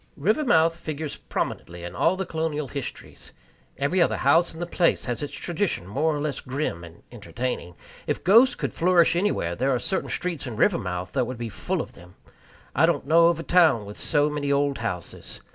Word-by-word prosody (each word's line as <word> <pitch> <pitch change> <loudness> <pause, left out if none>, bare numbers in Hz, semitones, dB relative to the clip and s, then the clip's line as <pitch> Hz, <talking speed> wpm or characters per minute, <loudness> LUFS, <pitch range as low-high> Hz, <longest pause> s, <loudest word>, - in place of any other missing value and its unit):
Rivermouth 165 - +3
figures 155 -2 -5
prominently 85 0 -4
in 85 0 -7
all 165 - +2
the 190 0 -3
colonial 160 -3 -2
histories. 140 -3 -8 0.4
Every 155 +7 +1
other - - +2
house 165 +6 +3
in 160 - -10
the 175 - -2
place 175 0 +1
has 120 +2 -3
its 145 - -4
tradition 175 - -2
more 150 - 0
or - - -3
less 145 -2 -2
grim 130 - -3
and 85 0 -13
entertaining. 120 -5 -5 0.3
If - - -2
ghosts 230 +8 +6
could - - -3
flourish 170 -1 +4
anywhere, 175 - 0
there 130 +9 0
are 130 - +2
certain 190 +9 -2
streets 170 -7 -2
in 120 - -5
Rivermouth 90 -3 0
that 130 -3 0
would 130 - -5
be 120 -1 -4
full 100 - -2
of - - -14
them. 90 +1 -16 0.6
I - - +5
don't - - 0
know 165 +3 +5
of 170 -1 +1
a - - -4
town 160 - +4
with 105 +1 -9
so 145 -2 +1
many 145 -1 -2
old 140 0 +1
houses. 95 -7 -5
145 Hz, 195 wpm, -25 LUFS, 120-170 Hz, 0.6 s, ghosts